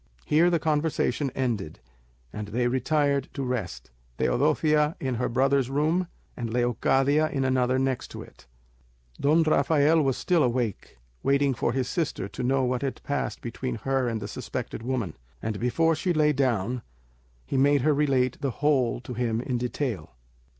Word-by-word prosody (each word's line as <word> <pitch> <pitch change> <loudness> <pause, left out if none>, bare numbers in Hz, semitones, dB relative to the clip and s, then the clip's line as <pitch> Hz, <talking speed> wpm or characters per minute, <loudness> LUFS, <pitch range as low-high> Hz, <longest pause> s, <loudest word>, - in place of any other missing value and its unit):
Here 165 +4 +4
the 170 - +2
conversation 150 -3 0
ended, 115 -11 -2 0.5
and 105 -1 -5
they 120 +4 0
retired 140 +2 +1
to 140 - -2
rest, 90 - -4 0.3
Teodosia 150 - +2
in 130 -2 -2
her 125 +1 -1
brother's 130 +1 +2
room, 155 +6 +1 0.3
and 115 -2 -4
Leocadia 135 +5 +2
in 135 -2 -1
another 130 -1 +2
next 130 -1 -2
it. - - -11 0.7
Don 155 +4 +4
Rafael 155 +1 +3
was 135 -3 +1
still 175 -3 +2
awake, 120 - -1 0.2
waiting 140 0 +2
for 120 - -1
his 130 0 -1
sister 160 - -2
to 105 - -7
know 130 +2 +1
what 125 0 0
had 135 -2 -4
passed 145 - -3
between 125 +1 -4
her 135 +2 0
and 115 -2 -2
the 100 - -5
suspected 105 - -5
woman; 120 -8 -2 0.3
and 105 - -3
before 160 +8 +2
she 175 +3 0
lay 150 -1 +3
down, 125 -3 0 0.6
he - - -4
made 140 +1 +4
her 150 +3 +3
relate 135 -3 +1
the 140 - 0
whole 130 -3 +1
to 125 - -7
him 115 -2 -1
in 125 0 -2
detail. 120 - -3
130 Hz, 160 wpm, -26 LUFS, 120-145 Hz, 0.7 s, Here